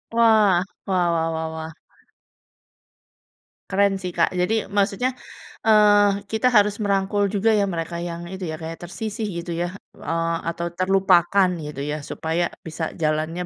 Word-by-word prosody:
Wah, 215 -6 +4 0.2
wah 185 -2 +2
wah 165 -1 0
wah 160 0 -3
wah. 160 0 -6 2.0
Keren 200 0 +3
sih, 180 - -3
Kak, 165 - +4
jadi 220 +5 +1
maksudnya, 205 +5 0 0.5
eee, 205 -2 +4
kita 220 +3 +2
harus 210 -2 +3
merangkul 200 0 +1
juga 215 +2 +2
ya, 205 -1 +3
mereka 170 +1 -4
yang 170 0 -5
itu 185 -3 -5
ya, 155 - -4
kayak 165 +1 -7
tersisih 215 +5 -4
gitu 170 -1 -5
ya, 175 - -1 0.2
eee, 165 0 -2 0.2
atau 170 +1 -4
terlupakan 185 0 +3
gitu 150 -2 -7
ya. 150 0 -3
Supaya 160 +4 -2 0.2
bisa 160 0 -4
jalannya 155 +3 -1
185 Hz, 145 wpm, -23 LUFS, 165-205 Hz, 2.0 s, Wah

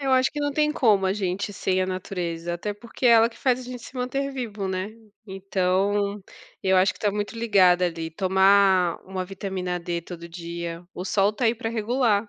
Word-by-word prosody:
Eu 270 -1 0
acho 260 0 +4
que 295 - -6
não 290 -1 -1
tem 300 +1 +2
como 215 -9 +3
a 190 - +2
gente, 200 +1 -2
sem 185 -1 0
a - - -1
natureza, 175 -2 -4
até 205 +4 -3
porque 235 +4 -9
é - - +7
ela 230 0 +6
que 230 - -17
faz 255 -2 +1
a - - -7
gente 245 -2 -8
se 260 - -11
manter 275 +3 -2
vivo, 215 -7 -4
né. 185 +1 -2 0.4
Então, 195 +1 0 0.4
eu 190 0 +3
acho 185 0 +4
que - - -18
tá 205 - +2
muito 205 +3 -4
ligado 190 -6 +4
ali, 165 -2 -1
tomar 190 0 +4
uma 185 -1 -4
vitamina 185 -2 -4
D 170 0 -3
todo 170 0 -9
dia, 170 0 -6
o 180 - -5
sol 200 +1 +2
tá 240 - -3
aí 230 +1 +3
pra 225 -1 -3
regular. 225 -2 +1
195 Hz, 210 wpm, -25 LUFS, 180-225 Hz, 0.4 s, é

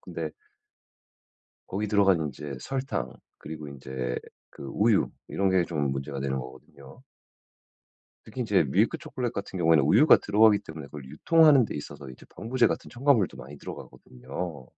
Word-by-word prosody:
근데 85 -4 -5 1.4
거기 105 +3 -3
들어가는 95 -6 +3
인제 70 0 -7
설탕 135 - -3 0.3
그리고 75 -1 -8
인제 65 -2 -5 0.3
그 - - -12
우유 105 +9 +2 0.2
이런 95 -1 0
게 95 -2 +3
좀 75 -5 -1
문제가 70 +1 -4
되는 65 0 -2
거거든요. 70 - -12 1.2
특히 120 +4 -8
인제 105 -7 +2
밀크 100 - +1
초콜릿 130 -6 -4
같은 100 -2 -5
경우에는 80 -3 +4
우유가 115 - +6
들어가기 105 0 +4
때문에 80 -3 -9
그걸 75 -2 -10
유통하는 145 - +5
데 - - -7
있어서 70 -1 -8
이제 65 - -13
방부제 120 +4 +1
같은 - - -3
첨가물도 120 -5 +2
많이 70 +1 -11
들어가거든요. 65 +3 -8
85 Hz, 355 characters per minute, -27 LUFS, 70-110 Hz, 1.4 s, 우유가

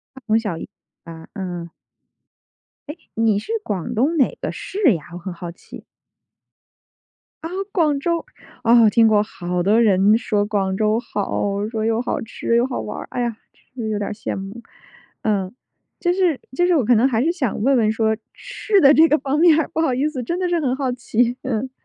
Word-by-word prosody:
它 265 - -12
从 220 -1 +3
小 205 -7 -4
一 - - -7 0.4
啊， 165 -1 -11
嗯。 175 -4 -5 1.2
诶？ 300 - -6 0.2
你 225 -2 +2
是 210 - -5
广 205 +4 -3
东 280 +9 +1
哪 270 - +2
个 - - -2
市 375 - +1
呀？ 155 - -7
我 175 - -6
很 180 +1 -6
好 175 0 -7
奇。 170 - -13 1.6
啊！ 325 - -4 0.2
广 305 -7 +1
州。 335 - -1 0.4
哦， 230 -1 +6
听 225 +1 +4
过。 210 -1 +4
好 180 -3 -3
多 215 +5 +4
人 205 0 +4
说 210 -3 0
广 195 -2 -1
州 215 +2 +1
好， 205 -2 -2
说 220 -1 -2
又 225 +1 +1
好 - - -2
吃 230 +1 -2
又 235 - +3
好 255 - -3
玩 - - -6
儿。 - - -8
哎 245 - -2
呀， 235 -2 -2 0.4
其 245 - -5
实 220 - -3
有 215 - -1
点 205 - -3
羡 210 - -4
慕。 195 +4 -7 0.6
嗯， 200 -3 -1 0.5
就 350 - +1
是 360 -6 +1 0.2
就 350 - +2
是 360 - +3
我 285 - +2
可 240 +2 +4
能 230 +4 +4
还 240 -2 +1
是 330 - +2
想 260 - -2
问 270 +1 +4
问 215 -2 +2
说 220 0 +1 0.2
吃 440 -4 0
的 280 +1 +7
这 320 +2 +6
个 305 - +3
方 280 +2 -1
面 330 -2 +6
儿， 315 - -1
不 - - -2
好 270 -6 +1
意 270 +4 +1
思， 295 -4 -4
真 340 +9 -2
的 360 -1 0
是 345 - +1
很 260 -5 0
好 265 -2 -1
奇。 245 0 0
嗯。 260 -1 -2
230 Hz, 220 characters per minute, -21 LUFS, 205-280 Hz, 1.6 s, 的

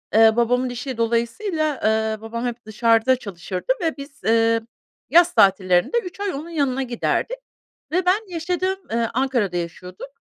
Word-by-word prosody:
eee, 220 0 +6
babamın 245 +2 +1
işi 245 +1 -5
dolayısıyla, 255 - 0
eee, 220 0 +1
babam 230 +2 -5
hep 240 -2 -5
dışarıda 230 +3 +3
çalışırdı 190 - -3
ve 325 -2 -1
biz, 280 0 -11
eee, 230 0 +3 0.5
yaz 345 +3 +5
tatillerinde 190 - +3
3 360 +2 -9
ay 405 -2 -2
onun 305 +5 -6
yanına 275 -5 0
giderdik 255 - -1 0.5
ve 360 +3 +1
ben 390 +3 +1
yaşadığım, 360 +3 -2
eee, 230 0 0
Ankara'da 240 -8 0
yaşıyorduk 180 +6 -7
240 Hz, 145 wpm, -22 LUFS, 220-315 Hz, 0.5 s, eee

